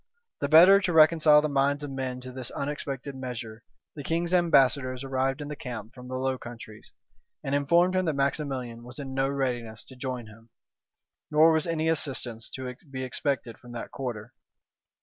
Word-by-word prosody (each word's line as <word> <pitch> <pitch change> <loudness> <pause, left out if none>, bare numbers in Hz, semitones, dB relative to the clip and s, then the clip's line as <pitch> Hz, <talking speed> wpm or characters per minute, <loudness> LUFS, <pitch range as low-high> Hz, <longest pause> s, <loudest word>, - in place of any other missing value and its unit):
The 140 - -1
better 180 +6 +8
to 180 -3 -1
reconcile 155 -1 +6
the - - +2
minds 140 0 +1
of 145 - -5
men 130 -1 -4
to 130 0 -8
this 130 -1 -5
unexpected 140 -1 -4
measure, 120 -4 -7 0.3
the 150 - -6
king's 170 +3 -1
ambassadors 135 -7 +3
arrived 135 +1 -1
in 145 - -5
the 150 - -5
camp 115 -5 -7
from 125 -1 -11
the 130 - -5
Low 130 0 -1
Countries, 115 -2 -10 0.5
and 135 -1 -3
informed 170 +6 +3
him, 185 0 +1
that 160 -3 0
Maximilian 135 -4 -2
was 125 +1 -10
in 135 -2 -6
no 135 0 +1
readiness 120 -5 -3
to 130 - -14
join 125 -2 -5
him; 115 +1 -16 0.8
nor 155 +2 +6
was 160 0 +1
any 160 -1 0
assistance 130 -7 -2
to 130 -1 -6
be 130 -1 -5
expected 130 -2 -3
from 120 0 -12
that 120 - -6
quarter. 120 -3 -6
135 Hz, 180 wpm, -27 LUFS, 125-150 Hz, 0.8 s, better